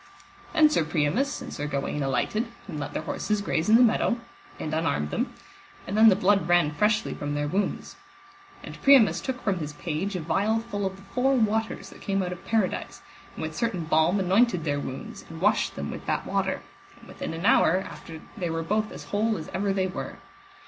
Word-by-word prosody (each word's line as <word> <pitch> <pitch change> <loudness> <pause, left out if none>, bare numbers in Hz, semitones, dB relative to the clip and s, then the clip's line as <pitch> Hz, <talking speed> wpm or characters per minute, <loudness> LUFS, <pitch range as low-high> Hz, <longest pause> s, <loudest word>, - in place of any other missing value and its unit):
Then 310 0 +6
Sir 295 - +2
Priamus 160 - 0
and - - -8
Sir 145 - -3
Gawaine 140 +1 -2
alighted, 145 - 0 0.2
and 160 -6 -5
let 145 - -5
their - - -3
horses 210 0 -1
graze 195 -3 -1
in 220 - +7
the 245 - +7
meadow, 235 0 +3 0.4
and 155 - -4
unarmed 155 - 0
them, - - -1 0.5
and 195 - -4
then 220 +1 +8
the 195 - +5
blood 195 -2 +2
ran 175 -4 +4
freshly 210 +8 +1
from 145 0 -4
their 145 0 -1
wounds. 195 +7 -2 0.7
And - - -9
Priamus 235 -12 +6
took 255 -2 -4
from 195 -4 0
his 150 -2 -5
page 170 +6 -3
a - - -1
vial 200 +7 +1
full 205 -4 -2
of 190 - -6
the 195 - -15
four 250 +7 +1
waters 220 -1 0
that - - -14
came 195 -1 0
out 180 - -3
of 180 - -8
Paradise, 220 -5 -1 0.3
and - - -5
with - - -4
certain 195 -8 -1
balm 160 +5 +3
anointed 190 0 +3
their 145 -2 0
wounds, 130 -2 -7
and - - -8
washed - - +2
them - - -4
with - - -8
that - - -1
water, - - -1 0.3
and - - -17
within - - -6
an 165 +4 -5
hour 185 - +5
after 160 -1 -10
they 175 -3 -3
were 165 0 -2
both 210 +5 0
as - - -8
whole 215 +1 0
as 155 - -7
ever 195 +2 -1
they 190 -1 +1
were. 185 - -5
190 Hz, 210 wpm, -26 LUFS, 160-215 Hz, 0.7 s, then